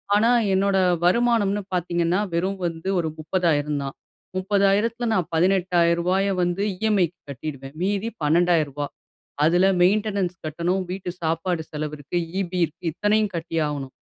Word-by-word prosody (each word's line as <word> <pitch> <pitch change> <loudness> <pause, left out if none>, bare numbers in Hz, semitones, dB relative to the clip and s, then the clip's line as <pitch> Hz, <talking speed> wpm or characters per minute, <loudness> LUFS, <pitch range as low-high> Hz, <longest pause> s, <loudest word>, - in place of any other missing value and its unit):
ஆனா 230 +3 +4 0.2
என்னோட 195 0 +2 0.3
வருமானம்னு 205 0 +2
பார்த்தீங்கன்னா 175 +1 0
வெறும் 190 +3 -1
வந்து 165 +2 -3
ஒரு 160 -2 -1
30000 155 -3 0
தான். 135 - -6 0.4
30000த்துல 205 +5 +1
நான் 185 -6 0
18000ரூபாய 180 +1 +2
வந்து 175 +2 0 0.2
இஎம்ஐக்கு 190 -5 +1
கட்டிடுவேன். 135 0 -7
மீதி 200 +3 0 0.2
12000ரூபா 150 -3 +2 0.6
அதுல 175 +4 +4 0.2
மெயின்டெனன்ஸ் 200 -1 +2
கட்டணும், 170 +5 -1
வீட்டு 185 -1 -4
சாப்பாடு 165 +1 -1
செலவு 150 0 -4
இருக்கு, 145 +4 -4 0.2
இபி 180 -1 -3
இருக்கு 160 +3 -17
இத்தனையும் 210 -1 +1
கட்டியாகணும். 150 -5 -2
175 Hz, 120 wpm, -23 LUFS, 160-195 Hz, 0.6 s, ஆனா